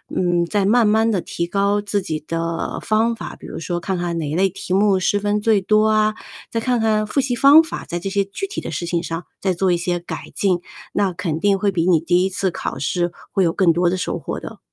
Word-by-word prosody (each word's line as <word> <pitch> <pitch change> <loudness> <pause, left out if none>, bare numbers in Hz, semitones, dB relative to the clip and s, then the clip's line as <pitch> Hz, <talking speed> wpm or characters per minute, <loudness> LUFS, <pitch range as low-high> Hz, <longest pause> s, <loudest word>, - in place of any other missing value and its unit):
嗯， 175 -1 +1
再 205 +3 0
慢 225 +2 +4
慢 220 +2 +3
地 200 - +1
提 170 0 -3
高 200 +3 +1
自 205 0 -1
己 155 -4 -4
的 165 0 -3
方 220 +2 +1
法， - - -7
比 - - -13
如 - - -7
说 175 +1 -3
看 190 +2 -2
看 175 -1 -2
哪 155 -3 -2
一 150 - -2
类 190 +2 +3
题 180 0 -5
目 200 0 +4
失 195 +2 +1
分 205 +1 0
最 215 -1 +3
多 215 +3 +3
啊， 215 0 +2 0.3
再 230 - -2
看 245 0 +1
看 215 -1 +2
复 215 - -1
习 260 -2 0
方 280 +5 +8
法， 325 - -6
在 175 - -4
这 195 - -4
些 200 0 +1
具 200 - -5
体 400 - -5
的 - - -6
事 175 - -3
情 170 0 -1
上 165 0 -5 0.2
再 190 - +1
做 180 +1 +1
一 175 - +1
些 175 0 -1
改 175 - -8
进， 185 -3 +1 0.3
那 200 -2 +1
肯 170 -3 -3
定 200 -1 +3
会 205 - +2
比 175 -3 0
你 175 -4 +4
第 175 +2 +2
1 190 - +1
次 190 0 -1
考 - - -5
试 175 +4 -1 0.2
会 195 - +3
有 170 - +2
更 175 -1 +3
多 175 +1 +2
的 185 - -1
收 180 - -2
获 - - -5
的。 - - -9
190 Hz, 275 characters per minute, -20 LUFS, 175-215 Hz, 0.3 s, 方